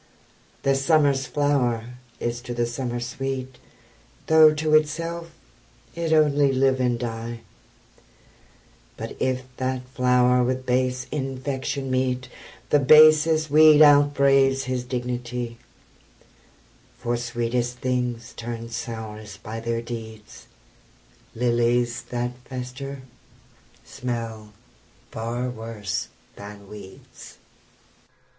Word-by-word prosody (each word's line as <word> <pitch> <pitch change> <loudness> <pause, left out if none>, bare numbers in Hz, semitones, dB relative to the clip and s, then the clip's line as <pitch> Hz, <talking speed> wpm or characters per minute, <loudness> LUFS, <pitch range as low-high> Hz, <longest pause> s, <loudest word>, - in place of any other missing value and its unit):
The 135 - +3
summer's 135 -1 +2
flower 125 -4 0 0.2
is 120 0 -3
to 120 -1 -6
the 120 0 +1
summer 120 0 -4
sweet, 130 +1 -5 0.7
Though 160 -1 +7
to 155 0 -1
itself 165 +2 +1 0.6
it 170 -1 -3
only 145 -3 +4
live 135 0 +2
and 125 -2 +1
die, 115 0 -5 1.6
But - - -6
if 130 0 0
that 130 -1 -3
flower 125 -1 +3
with 130 +1 -2
base 125 0 0
infection 135 -1 -3
meet, 130 -1 -1 0.4
The 145 - +5
basest 155 +2 +6
weed 155 0 +8
out 145 -1 +6
braves 135 -1 +3
his 130 -1 -2
dignity; 125 -1 -4 1.4
For 120 -1 -2
sweetest 120 +1 -2
things 125 -2 -2
turn 115 0 -6
sourest 110 -3 -7
by 110 +1 -6
their 115 0 -2
deeds; 110 -2 -9 0.9
Lilies 120 0 +1
that 120 0 -2
fester 130 +1 -7 0.8
smell 115 -3 -5 0.6
far 115 +3 -3
worse 110 -7 -4 0.3
than 100 0 -10
weeds. 100 -2 -13
125 Hz, 100 wpm, -24 LUFS, 120-135 Hz, 1.6 s, weed